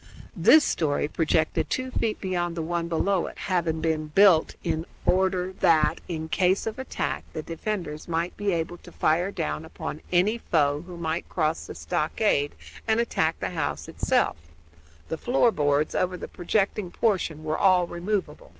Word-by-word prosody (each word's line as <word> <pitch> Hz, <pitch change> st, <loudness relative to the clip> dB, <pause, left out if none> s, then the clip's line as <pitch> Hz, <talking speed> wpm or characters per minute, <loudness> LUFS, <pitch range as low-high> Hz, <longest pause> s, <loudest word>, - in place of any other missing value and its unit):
This 310 Hz, -1 st, +6 dB
story 145 Hz, -3 st, 0 dB
projected 160 Hz, 0 st, 0 dB
two 255 Hz, 0 st, -2 dB
feet 220 Hz, -3 st, -1 dB
beyond 175 Hz, -3 st, -2 dB
the 165 Hz, -, -1 dB
one 170 Hz, +1 st, -2 dB
below 180 Hz, +2 st, +1 dB
it, -, -, -9 dB
having 170 Hz, -4 st, -1 dB
been 160 Hz, -1 st, 0 dB
so -, -, -17 dB
built 190 Hz, -5 st, +5 dB
in 160 Hz, +2 st, -2 dB, 0.2 s
order 185 Hz, 0 st, +1 dB
that, 155 Hz, -2 st, +3 dB
in 160 Hz, -2 st, -4 dB
case 185 Hz, +3 st, +2 dB
of 225 Hz, +3 st, -4 dB
attack, 260 Hz, -, -3 dB
the 155 Hz, -, -4 dB
defenders 165 Hz, -3 st, -4 dB
might 170 Hz, +1 st, -1 dB
be 205 Hz, -1 st, -1 dB
able 170 Hz, 0 st, -2 dB
to -, -, -14 dB
fire 170 Hz, +4 st, +1 dB
down 75 Hz, -, -3 dB
upon -, -, -6 dB
any 195 Hz, +6 st, +3 dB
foe 145 Hz, -6 st, +1 dB
who 180 Hz, -1 st, -8 dB
might 165 Hz, 0 st, -3 dB
cross 160 Hz, -2 st, -1 dB
the -, -, -8 dB
stockade 155 Hz, -3 st, 0 dB, 0.3 s
and 220 Hz, 0 st, +3 dB
attack 165 Hz, -8 st, 0 dB
the -, -, -3 dB
house 145 Hz, -, -3 dB
itself; -, -, +1 dB, 0.7 s
the 160 Hz, -, -3 dB
floor 245 Hz, -1 st, +3 dB
boards 145 Hz, -3 st, +1 dB
over 180 Hz, 0 st, 0 dB
the -, -, -7 dB
projecting 195 Hz, +1 st, -1 dB
portion 175 Hz, -7 st, 0 dB
were 155 Hz, 0 st, -1 dB
all 185 Hz, -2 st, +5 dB
removable. 205 Hz, -, -3 dB
175 Hz, 170 wpm, -26 LUFS, 160-195 Hz, 0.7 s, This